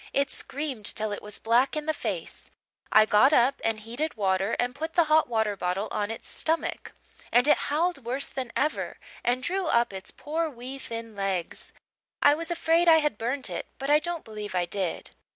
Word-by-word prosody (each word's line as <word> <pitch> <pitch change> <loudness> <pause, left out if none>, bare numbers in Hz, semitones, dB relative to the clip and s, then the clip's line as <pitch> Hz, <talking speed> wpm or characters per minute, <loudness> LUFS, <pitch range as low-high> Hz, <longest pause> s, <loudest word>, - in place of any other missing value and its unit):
It 280 0 +1
screamed 270 -7 -4
till 215 0 -1
it 205 - -4
was 210 -1 -6
black 240 +5 +2
in 305 -1 -3
the 315 - +1
face; - - -5 0.4
I 215 - +7
got 220 +7 +5
up 255 0 +4
and 225 -1 0
heated 240 +7 -4
water 195 +1 +1
and 245 0 0
put 320 +4 -5
the 345 - +6
hot 310 0 +4
water 220 -3 +1
bottle 185 +2 -1
on 205 0 -1
its 225 - -7
stomach, 325 +1 -2 0.4
and 245 +3 +5
it - - +7
howled 315 -1 0
worse 255 +4 -2
than 255 -3 -5
ever 300 +3 -1 0.3
and 250 +1 +1
drew 375 -1 -1
up 235 -6 +2
its 190 0 -6
poor 320 +3 -2
wee 260 0 -8
thin 230 -3 -7
legs. 195 -4 -3 0.5
I 290 - +6
was 325 +2 -4
afraid 340 0 +2
I 325 -1 +8
had 295 -8 0
burnt 255 +4 -2
it - - -5
but 275 +1 -2
I 300 - +7
don't 345 +1 -4
believe 210 -3 -6
I 175 -1 +2
did. 185 0 -3
250 Hz, 200 wpm, -27 LUFS, 215-305 Hz, 0.5 s, I